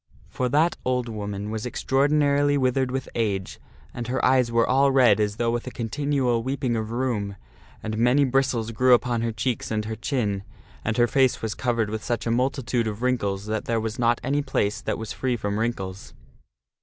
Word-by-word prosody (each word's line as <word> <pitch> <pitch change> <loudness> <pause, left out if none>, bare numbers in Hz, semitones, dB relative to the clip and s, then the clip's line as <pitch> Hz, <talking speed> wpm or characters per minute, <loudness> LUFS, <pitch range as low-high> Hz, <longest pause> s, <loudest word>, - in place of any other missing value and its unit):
For 125 -1 -1
that 155 +6 +2
old 125 -1 0
woman 105 -1 -4
was 110 0 -3
extraordinarily 145 +2 +2
withered 130 -1 +1
with 130 +1 -3
age, 100 -5 -2 0.3
and 120 -1 -5
her 130 +1 0
eyes 125 -2 +3
were 115 0 +3
all 135 +2 +4
red 125 -6 +5
as 105 -1 0
though 115 +1 0
with 120 +1 -3
a - - -1
continual 125 0 0
weeping 130 -1 -1
of 110 -1 -2
rheum, 115 -5 -2 0.5
and 110 0 -3
many 125 +5 +4
bris 135 +1 +2
tles 115 -2 -3
grew 125 +2 +5
upon 120 -1 -1
her 115 0 -1
cheeks 110 +3 -2
and 110 -1 -1
her 110 0 -4
chin, 105 -7 -1 0.4
and 110 0 -1
her 120 - +5
face 130 0 +2
was 110 -1 -1
covered 115 -4 -1
with 110 -1 -4
such 120 -2 -2
a 115 - 0
multitude 125 -1 0
of 110 +2 -4
wrinkles 105 -6 0
that 110 0 -2
there 115 -1 0
was 110 +1 -4
not 120 0 +2
any 140 +2 +1
place 105 -6 -1
that - - -2
was 110 -1 -5
free 125 -2 -1
from 105 -1 -2
wrinkles. 95 -5 -4
120 Hz, 200 wpm, -25 LUFS, 110-130 Hz, 0.5 s, red